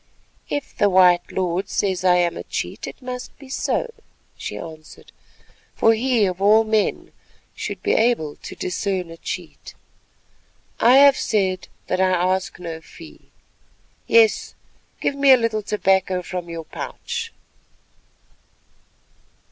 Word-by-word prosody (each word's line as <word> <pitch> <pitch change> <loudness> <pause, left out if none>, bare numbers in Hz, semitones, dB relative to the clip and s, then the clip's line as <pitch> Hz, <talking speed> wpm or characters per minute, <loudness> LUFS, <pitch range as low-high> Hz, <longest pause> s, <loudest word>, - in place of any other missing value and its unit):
"If 290 - -4
the 205 - +3
white 180 -2 +4
lord 185 0 -2
says 190 -2 -1
I 180 -1 +5
am 175 -1 +1
a - - -5
cheat, - - -5
it - - -10
must 250 0 -7
be 270 -1 -14
so," 470 - -2 0.4
she - - -6
answered, 155 -2 -11 0.6
"for 225 - +4
he 235 -1 +2
of 185 0 -3
all 215 +3 +5
men 215 -1 0 0.4
should - - -6
be - - +2
able 220 -11 +1
to - - -9
discern 180 -1 -3
a 165 - -10
cheat. - - -7 1.0
I 245 +3 +6
have 280 0 +7
said 190 -4 0 0.2
that 185 - -1
I 190 - +4
ask 185 +1 0
no 165 -2 -7
fee;—yes, 450 - -2 0.4
give - - 0
me 280 -1 +6
a - - +7
little 230 -2 -1
tobacco 190 -3 +1
from 175 -1 -6
your 165 -1 -6
pouch." 460 - -6
190 Hz, 130 wpm, -22 LUFS, 180-235 Hz, 1.0 s, have